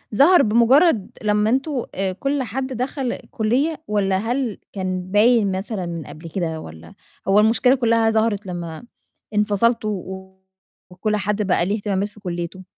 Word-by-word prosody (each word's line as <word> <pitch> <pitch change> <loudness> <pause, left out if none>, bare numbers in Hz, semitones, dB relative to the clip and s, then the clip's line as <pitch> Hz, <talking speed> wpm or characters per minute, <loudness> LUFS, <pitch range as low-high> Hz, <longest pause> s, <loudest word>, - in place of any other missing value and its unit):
ظهر 330 - +6
بمُجرّد 235 - +4
لمّا 210 0 +2
أنتم 270 +6 0 0.2
آآ، 190 0 -1
كلّ 275 +8 -1
حد 260 +4 -3
دَخل 255 0 -3 0.2
كُلّية؟ 270 +9 0
والّا 195 -2 +1
هل 235 +2 -2 0.2
كان 185 -1 -4
باين 215 0 +4
مثلًا 195 -1 -4
من 170 -2 -5
قبل 155 +3 -10
كده؟ 165 -2 -3
والّا 80 +1 -12 0.3
هو 195 +2 +5
المشكلة 230 +4 +4
كلّها 230 -3 +2
ظهرت 220 -2 +1
لمّا 170 -2 -6 0.5
انفصلتوا 210 +2 +2
و 190 0 -10 0.5
وكلّ 210 +4 -1
حد 210 0 -1
بقى 185 -3 +1
ليه 200 +3 0
اهتمامات 200 -1 -1
في 210 - -17
كُلّيته؟ 175 -1 -5
210 Hz, 150 wpm, -21 LUFS, 190-235 Hz, 0.5 s, ظهر